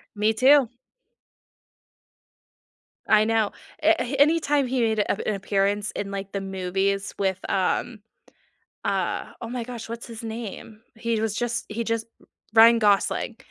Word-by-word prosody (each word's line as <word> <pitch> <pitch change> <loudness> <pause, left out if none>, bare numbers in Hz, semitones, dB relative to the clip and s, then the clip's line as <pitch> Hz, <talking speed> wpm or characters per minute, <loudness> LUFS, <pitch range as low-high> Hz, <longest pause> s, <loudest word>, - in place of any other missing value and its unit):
Me 215 +2 +2
too. 265 +3 +5 2.4
I 215 0 +5
know, 220 -1 +1 0.3
a 325 +2 +4 0.2
anytime 295 -2 +3
he 255 0 -1
made 220 -2 +1
ap - - 0
an 215 - +1
appearance 200 +1 0
in, 200 -1 -4
like, 195 0 -6
the 200 - -2
movies 195 +1 -2
with, 190 -2 0
um, 210 +4 0 0.8
uh - - -1
oh 230 - -6
my 245 0 -4
gosh, 240 -2 -8
what's 230 +1 -7
his 230 -1 -8
name? 220 -1 -7 0.2
He 225 0 -1
was 220 -2 -1
just 240 +1 -2
he 230 +2 -3
just 230 0 -1 0.5
Ryan 230 +1 +7
Gosling. 210 +2 +1
220 Hz, 140 wpm, -24 LUFS, 200-235 Hz, 2.4 s, Ryan